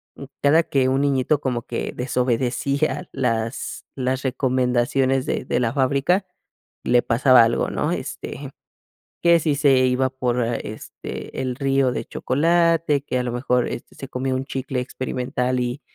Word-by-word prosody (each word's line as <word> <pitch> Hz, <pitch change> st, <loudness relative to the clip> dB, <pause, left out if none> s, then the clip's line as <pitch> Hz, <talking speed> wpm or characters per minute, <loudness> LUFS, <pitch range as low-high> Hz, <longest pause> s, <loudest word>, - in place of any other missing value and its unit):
m 140 Hz, -, -9 dB
cada 155 Hz, +4 st, +5 dB
que 130 Hz, -3 st, +1 dB
un 135 Hz, +1 st, +1 dB
niñito 140 Hz, +1 st, +2 dB
como 125 Hz, -4 st, -2 dB
que -, -, -3 dB
desobedecía 130 Hz, +6 st, 0 dB
las 115 Hz, -2 st, -2 dB
las 130 Hz, 0 st, -1 dB
recomendaciones 130 Hz, 0 st, +1 dB
de -, -, -2 dB
de -, -, 0 dB
la 115 Hz, 0 st, 0 dB
fábrica, 140 Hz, +8 st, +1 dB, 0.6 s
le 120 Hz, 0 st, +4 dB
pasaba 125 Hz, 0 st, +5 dB
algo, 115 Hz, +1 st, +1 dB
¿no?, -, -, -1 dB
este, -, -, -5 dB, 0.7 s
que 170 Hz, -1 st, +6 dB
si 150 Hz, -2 st, 0 dB
se 140 Hz, -2 st, +4 dB
iba 130 Hz, +1 st, +1 dB
por 125 Hz, -1 st, -1 dB
a 115 Hz, 0 st, 0 dB
este, 110 Hz, +4 st, -7 dB
el 130 Hz, -1 st, -2 dB
río 135 Hz, -1 st, +1 dB
de -, -, -4 dB
chocolate, 165 Hz, 0 st, +2 dB
que 130 Hz, -, -2 dB
a 125 Hz, -, -1 dB
lo 120 Hz, -, -3 dB
mejor 125 Hz, 0 st, +1 dB
este -, -, -7 dB
se 135 Hz, -, -8 dB
comió 130 Hz, +1 st, -2 dB
un 130 Hz, +1 st, -2 dB
chicle 135 Hz, -1 st, -3 dB
experimental, 125 Hz, 0 st, -2 dB
y 125 Hz, +3 st, -2 dB
130 Hz, 160 wpm, -22 LUFS, 125-140 Hz, 0.7 s, que